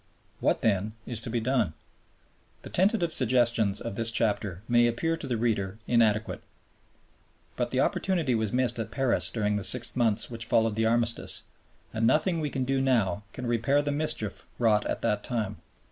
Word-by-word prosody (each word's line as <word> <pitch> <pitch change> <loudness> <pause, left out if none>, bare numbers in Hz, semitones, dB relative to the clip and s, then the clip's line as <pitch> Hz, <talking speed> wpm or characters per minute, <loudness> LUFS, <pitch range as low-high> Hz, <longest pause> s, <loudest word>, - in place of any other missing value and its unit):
What - - +1
then 105 0 0
is 115 -2 -3
to 115 - -5
be 120 +1 -1
done? 115 -8 0 0.9
The - - -10
tentative 185 -3 +1
suggestions 115 -5 +2
of 115 -4 -5
this 115 +1 +3
chapter 105 -5 -1
may 120 0 +4
appear 165 +8 -1
to 160 -4 -7
the 120 -3 -1
reader 105 -4 -1
inadequate. 110 -2 +1 1.1
But - - -1
the - - 0
opportunity 170 -9 0
was 110 -3 -1
missed 125 -2 +1
at 110 -1 -3
Paris 130 +1 0
during 105 -2 -1
the 100 - -4
six 120 +2 +3
months 115 -3 +2
which 115 -1 -7
followed 115 -1 +2
the 110 +1 +1
Armistice, 115 0 +1 0.5
and 115 +1 +1
nothing 165 +4 +2
we 150 -2 -2
can 135 -2 -2
do 135 +1 0
now 110 -8 +1
can 125 - -7
repair 120 +5 +1
the 145 - -1
mischief 145 -8 -2
wrought 110 -3 +2
at - - -3
that 105 0 0
time. 110 -5 -3
115 Hz, 175 wpm, -27 LUFS, 110-130 Hz, 1.1 s, may